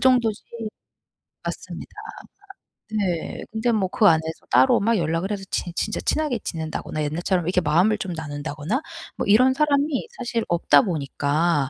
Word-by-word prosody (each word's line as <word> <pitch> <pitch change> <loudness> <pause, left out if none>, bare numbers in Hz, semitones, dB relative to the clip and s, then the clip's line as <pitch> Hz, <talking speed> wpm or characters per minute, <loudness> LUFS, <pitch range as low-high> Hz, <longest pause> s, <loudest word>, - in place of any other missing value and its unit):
정도지 245 -5 +3 1.0
맞습니다. - - -6 1.0
네. 190 -6 -2
근데 225 +2 0
뭐 210 -4 +1
그 210 - +2
안에서 160 -3 +3
따로 130 +2 +5
막 225 +2 +2
연락을 165 +3 -1
해서 200 -2 -3
제 175 - -2
진짜 215 - -1
친하게 300 -7 0
지낸다거나 160 -3 -4
옛날처럼 175 +3 0
이렇게 180 +1 +2
마음을 175 +7 +3
좀 185 -4 -4
나눈다거나 150 - -3 0.4
뭐 - - -1
이런 255 +6 +6
사람이 290 - +1
사실 240 - -3
없다 170 +8 +4
보니까 150 - 0
185 Hz, 325 characters per minute, -23 LUFS, 160-230 Hz, 1.0 s, 이런